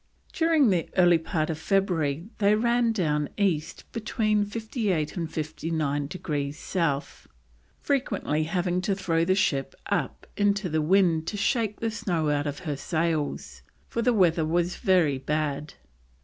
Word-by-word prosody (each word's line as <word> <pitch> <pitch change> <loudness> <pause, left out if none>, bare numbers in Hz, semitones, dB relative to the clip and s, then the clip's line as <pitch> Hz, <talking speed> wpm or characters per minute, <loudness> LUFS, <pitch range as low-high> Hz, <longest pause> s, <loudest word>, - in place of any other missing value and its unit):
During 320 - +3
the 175 -3 0
early 175 -2 +6
part 160 -1 -1
of 160 - -5
February 170 -4 0
they 205 0 +4
ran 235 +1 +2
down 150 -8 0
east 170 -6 0
between 215 -2 0
58 205 - -2
and 165 -3 -3
59 155 -2 -2
degrees 145 -3 -3
South, 155 -6 -2 0.5
frequently 200 - 0
having 180 +1 0
to 195 +1 0
throw 165 -4 0
the 185 +2 +2
ship 140 -8 0 0.2
up - - -1
into 205 -2 +1
the 155 0 +1
wind 165 -1 +3
to 210 - -3
shake 215 0 0
the 225 -1 0
snow 175 -8 -1
out 145 0 0
of 145 0 -5
her 150 -3 -1
sails, 160 0 -2 0.3
for 235 - -1
the 245 +1 +3
weather 175 -7 +3
was 170 +3 0
very 175 - +2
bad. 150 +1 -2
175 Hz, 150 wpm, -26 LUFS, 155-205 Hz, 0.5 s, early